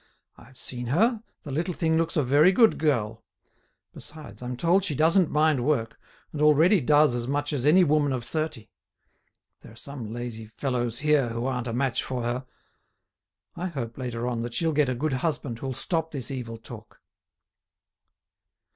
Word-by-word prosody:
I've 130 Hz, +3 st, -18 dB
seen 120 Hz, -1 st, -4 dB
her, 220 Hz, -, +2 dB, 0.2 s
the 145 Hz, -, -7 dB
little 170 Hz, +5 st, -2 dB
thing 160 Hz, -2 st, +1 dB
looks 165 Hz, 0 st, 0 dB
a 150 Hz, -, +3 dB
very 145 Hz, +7 st, +5 dB
good 225 Hz, +3 st, +4 dB
girl. 115 Hz, -8 st, 0 dB, 0.7 s
Besides, 150 Hz, -9 st, -11 dB
I'm 125 Hz, 0 st, -5 dB
told 175 Hz, +6 st, +3 dB
she 155 Hz, -7 st, -2 dB
doesn't 165 Hz, +4 st, +4 dB
mind 150 Hz, -4 st, +2 dB
work, 125 Hz, -5 st, -1 dB, 0.3 s
and 150 Hz, -, -4 dB
already 155 Hz, +5 st, +5 dB
does 150 Hz, 0 st, +4 dB
as 120 Hz, 0 st, -3 dB
much 145 Hz, +2 st, -1 dB
as 140 Hz, -1 st, 0 dB
any 180 Hz, +5 st, +6 dB
woman 150 Hz, -3 st, +2 dB
of 125 Hz, -2 st, -2 dB
thirty. 155 Hz, -3 st, -4 dB, 0.9 s
There -, -, -14 dB
are -, -, -15 dB
some 120 Hz, -2 st, -8 dB
lazy 115 Hz, -2 st, -6 dB
fellows 120 Hz, 0 st, -2 dB
here 145 Hz, -3 st, +2 dB
who 115 Hz, +1 st, -3 dB
aren't 125 Hz, -2 st, -2 dB
a -, -, -2 dB
match 130 Hz, 0 st, 0 dB
for 125 Hz, -2 st, -4 dB
her. 125 Hz, +2 st, -3 dB, 1.1 s
I 175 Hz, +2 st, -3 dB
hope, 120 Hz, -9 st, -5 dB
later 120 Hz, -2 st, -4 dB
on, 120 Hz, -2 st, -2 dB
that 120 Hz, 0 st, -5 dB
she'll 160 Hz, +3 st, +1 dB
get 145 Hz, -2 st, +2 dB
a 130 Hz, -, -1 dB
good 145 Hz, +3 st, -1 dB
husband 130 Hz, -4 st, -2 dB
who'll 130 Hz, 0 st, -4 dB
stop 160 Hz, +3 st, -2 dB
this 135 Hz, -3 st, -5 dB
evil 120 Hz, -4 st, -5 dB
talk." 115 Hz, 0 st, -12 dB
135 Hz, 175 wpm, -26 LUFS, 120-155 Hz, 1.1 s, any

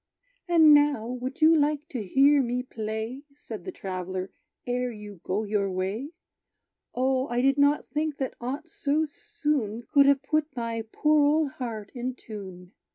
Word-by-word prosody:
"And 320 Hz, -3 st, +7 dB
now, 290 Hz, -6 st, +4 dB
would 250 Hz, +6 st, -5 dB
you 320 Hz, +1 st, +7 dB
like 300 Hz, -1 st, +1 dB
to 250 Hz, -, -4 dB
hear 275 Hz, +8 st, +4 dB
me 250 Hz, 0 st, -1 dB
play," 220 Hz, +2 st, -5 dB
Said 220 Hz, -9 st, -9 dB
the 185 Hz, -, -4 dB
traveller, 185 Hz, 0 st, -5 dB, 0.3 s
"ere 250 Hz, 0 st, -1 dB
you 210 Hz, -5 st, -10 dB
go 200 Hz, +4 st, -1 dB
your 205 Hz, -2 st, 0 dB
way? 190 Hz, +9 st, -3 dB, 0.9 s
O, 260 Hz, +1 st, +1 dB
I 240 Hz, +1 st, 0 dB
did 275 Hz, +1 st, +3 dB
not 285 Hz, +1 st, +3 dB
think 300 Hz, -1 st, -2 dB
that 265 Hz, -, -3 dB
aught 270 Hz, +7 st, -4 dB
so 310 Hz, -1 st, 0 dB
soon 295 Hz, -, -3 dB
Could 280 Hz, -2 st, +6 dB
have 280 Hz, -1 st, +4 dB
put 305 Hz, 0 st, -1 dB
my 230 Hz, -2 st, -3 dB
poor 300 Hz, -1 st, +3 dB
old 300 Hz, -1 st, +2 dB
heart 225 Hz, -6 st, -6 dB
in 250 Hz, 0 st, -4 dB
tune. 190 Hz, -6 st, -10 dB
255 Hz, 160 wpm, -27 LUFS, 215-290 Hz, 0.9 s, And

